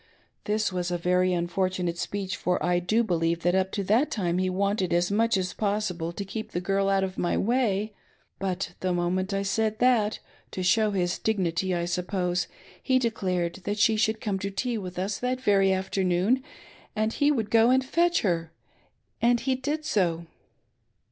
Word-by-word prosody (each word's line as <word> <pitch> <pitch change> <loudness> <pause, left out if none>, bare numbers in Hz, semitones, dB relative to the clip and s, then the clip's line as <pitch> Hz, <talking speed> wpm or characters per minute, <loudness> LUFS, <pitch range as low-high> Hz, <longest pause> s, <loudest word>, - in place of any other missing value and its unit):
This 210 -2 0
was 180 -1 -1
a 175 - -1
very 180 +1 +2
unfortunate 180 0 -1
speech, 195 -2 -3
for 180 0 0
I 175 0 +2
do 215 +7 +1
believe 170 -4 0
that 175 - +2
up 190 0 +1
to 200 - -1
that 225 +10 +2
time 180 -4 -1
he 185 0 +1
wanted 195 -1 0
as 175 +2 +2
much 225 +1 +2
as 185 -1 -2
possible 200 -5 -1
to 200 +3 -6
keep 215 +3 -6
the 175 - 0
girl 195 +2 0
out 195 -1 +2
of 190 -1 -4
my 175 - 0
way; 215 -3 0 0.5
but 190 -1 -3
the 185 -1 -1
moment 180 +2 -1
I 195 0 -1
said 215 +2 0
that, 230 -4 +3 0.4
to 185 - -3
show 215 +4 +3
his 180 -3 -1
dignity 185 -3 0
I 170 0 -1
suppose, 180 0 -1 0.3
he 260 - +2
declared 185 -8 -1
that 205 +1 -1
she 220 +1 +4
should 220 +1 +1
come 200 -3 -1
to 200 +1 -3
tea 225 +4 -2
with 180 -2 -7
us 195 +2 -2
that 250 +1 -1
very 200 -5 +3
afternoon, 190 +5 +1 0.5
and 215 +1 0
he 290 +1 +3
would 225 -7 -1
go 230 +1 +5
and 260 +1 +3
fetch 340 +5 +2
her; 165 -5 0 0.7
and 240 0 +3
he 265 - +1
did 290 +4 -3
so. 170 - 0
195 Hz, 185 wpm, -26 LUFS, 180-220 Hz, 0.7 s, go